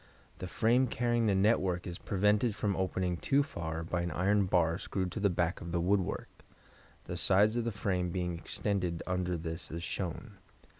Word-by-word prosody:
The 90 Hz, -, -4 dB
frame 120 Hz, +7 st, +3 dB
carrying 120 Hz, -1 st, +1 dB
the 100 Hz, -, +3 dB
network 95 Hz, -3 st, +2 dB
is 85 Hz, -1 st, -6 dB
prevented 105 Hz, +3 st, +2 dB
from 100 Hz, -3 st, 0 dB
opening 95 Hz, -1 st, -1 dB
too 140 Hz, +10 st, +2 dB
far 80 Hz, -, -4 dB
by 85 Hz, +1 st, -2 dB
an 85 Hz, -, -2 dB
iron 100 Hz, +4 st, +2 dB
bar 85 Hz, -2 st, +2 dB
screwed 95 Hz, -2 st, -2 dB
to -, -, -4 dB
the 100 Hz, -1 st, +3 dB
back 85 Hz, -1 st, -1 dB
of 85 Hz, -, -6 dB
the 85 Hz, -, 0 dB
woodwork, 95 Hz, +1 st, -1 dB, 0.6 s
the -, -, -5 dB
sides 105 Hz, +4 st, +4 dB
of 120 Hz, -1 st, 0 dB
the 115 Hz, -, 0 dB
frame 95 Hz, -4 st, -1 dB
being 90 Hz, -1 st, -2 dB
extended 90 Hz, 0 st, -2 dB
under 90 Hz, -1 st, -1 dB
this 80 Hz, +1 st, -5 dB
as 85 Hz, +1 st, -5 dB
shown. 95 Hz, +4 st, -4 dB
95 Hz, 185 wpm, -32 LUFS, 85-105 Hz, 0.6 s, sides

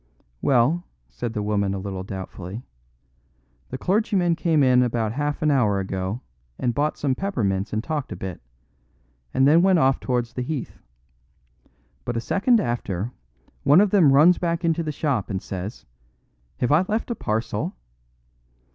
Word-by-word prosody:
"Well," 140 Hz, +7 st, +3 dB, 0.3 s
said -, -, -5 dB
the 105 Hz, -, -2 dB
woman 100 Hz, -2 st, 0 dB
a -, -, -3 dB
little 95 Hz, -1 st, -5 dB
doubtfully, 95 Hz, +2 st, -7 dB, 1.1 s
"the 130 Hz, -, -4 dB
clergymen 185 Hz, -, +1 dB
came 160 Hz, -4 st, +2 dB
in 125 Hz, -1 st, +5 dB
about 115 Hz, -3 st, 0 dB
half 145 Hz, +4 st, -2 dB
an 150 Hz, -, +3 dB
hour 110 Hz, -8 st, +2 dB
ago 95 Hz, +4 st, -3 dB, 0.4 s
and 120 Hz, -, 0 dB
bought 150 Hz, +3 st, 0 dB
some 140 Hz, -3 st, 0 dB
peppermints 115 Hz, -, -1 dB
and 110 Hz, +1 st, -2 dB
talked 150 Hz, -2 st, -3 dB
a -, -, -4 dB
bit, 95 Hz, -3 st, -6 dB, 0.9 s
and 135 Hz, +1 st, +3 dB
then 160 Hz, +4 st, +6 dB
went 190 Hz, 0 st, +4 dB
off 135 Hz, -3 st, +3 dB
towards 125 Hz, -2 st, -2 dB
the 125 Hz, -, -3 dB
Heath. 135 Hz, 0 st, -5 dB, 1.2 s
But 120 Hz, -1 st, -3 dB
a -, -, +1 dB
second 220 Hz, -, +2 dB
after, 115 Hz, -, -2 dB, 0.5 s
one 145 Hz, +5 st, +6 dB
of 205 Hz, -1 st, +4 dB
them 175 Hz, -9 st, +5 dB
runs 155 Hz, +6 st, +6 dB
back 170 Hz, 0 st, -1 dB
into 165 Hz, 0 st, +1 dB
the 155 Hz, -2 st, -2 dB
shop 140 Hz, -7 st, -1 dB
and 95 Hz, -3 st, -2 dB
says, 95 Hz, +3 st, -7 dB, 0.7 s
'Have 125 Hz, -, 0 dB
I 155 Hz, +5 st, +5 dB
left 220 Hz, +3 st, -1 dB
a -, -, -1 dB
parcel! 110 Hz, -, -2 dB
130 Hz, 160 wpm, -24 LUFS, 105-160 Hz, 1.2 s, then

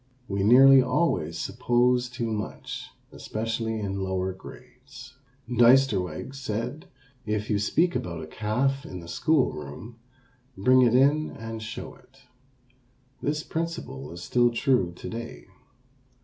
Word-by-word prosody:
We 100 Hz, 0 st, -2 dB
nearly 130 Hz, +5 st, +8 dB
always 125 Hz, -, 0 dB
suppose 125 Hz, +3 st, +1 dB
too 120 Hz, -2 st, -3 dB
much, 105 Hz, -1 st, -6 dB, 0.2 s
especially 110 Hz, 0 st, -3 dB
in 100 Hz, -2 st, -3 dB
lower 95 Hz, 0 st, -2 dB
grades. 130 Hz, +5 st, -13 dB, 0.3 s
Diesterweg 120 Hz, -, +3 dB
said: 130 Hz, -, -4 dB, 0.4 s
"If 105 Hz, +1 st, -2 dB
you 105 Hz, -, +2 dB
speak 165 Hz, -, +1 dB
about 85 Hz, -2 st, -4 dB
a -, -, -6 dB
calf 125 Hz, -, -1 dB
in 90 Hz, -, -8 dB
the 85 Hz, -, -11 dB
school 155 Hz, -, +2 dB
room, 75 Hz, -, -9 dB, 0.6 s
bring 130 Hz, +6 st, +5 dB
it 120 Hz, -1 st, +4 dB
in 145 Hz, +4 st, +3 dB
and 115 Hz, 0 st, -7 dB
show 110 Hz, +1 st, -7 dB
it." -, -, -22 dB, 1.0 s
This 150 Hz, +2 st, -1 dB
principle 160 Hz, -, -5 dB
is 85 Hz, +1 st, -8 dB
still 120 Hz, +3 st, +3 dB
true 120 Hz, -, +1 dB
to -, -, -9 dB
day. 115 Hz, +1 st, -7 dB
115 Hz, 130 wpm, -26 LUFS, 100-130 Hz, 1.0 s, nearly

